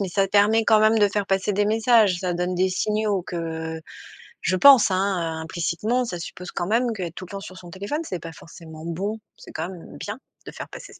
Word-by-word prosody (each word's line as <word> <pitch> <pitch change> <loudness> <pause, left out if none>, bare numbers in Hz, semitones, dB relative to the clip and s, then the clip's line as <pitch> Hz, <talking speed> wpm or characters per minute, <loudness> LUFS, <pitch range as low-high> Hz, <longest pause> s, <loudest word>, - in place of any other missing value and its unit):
mais 195 - -1
ça 195 +2 +1
permet 210 +3 +4
quand 220 - +6
même 220 +1 +4
de 205 -1 +5
faire 200 +1 -1
passer 195 +1 0
des 205 +1 +2
messages. 220 -2 +4
Ça 180 -2 -1
donne 180 +1 -1
des 185 +1 +2
signaux 210 +1 0
que, 175 - -6 0.4
heu, - - -8 0.6
je 185 - 0
pense, 265 +3 +7
hein, 185 -4 -1
implicitement 175 +9 -1
ça 180 -7 -5
suppose 180 +1 -8
quand 175 - -3
même 230 +3 +1
qu'être 180 -6 -5
tout 185 - -7
le 180 - -14
temps 200 - -5
sur 185 -1 -10
son 180 -2 -11
téléphone 200 - -4
c'est 185 - -5
pas 165 - -8
forcément 160 -1 -12
bon. 195 +6 -3 0.2
C'est - - -13
quand 160 - -4
même 180 -3 -11
bien - - -6 0.3
de - - -8
faire - - -8
passer - - -11
ce - - -17
190 Hz, 235 wpm, -24 LUFS, 175-215 Hz, 0.6 s, pense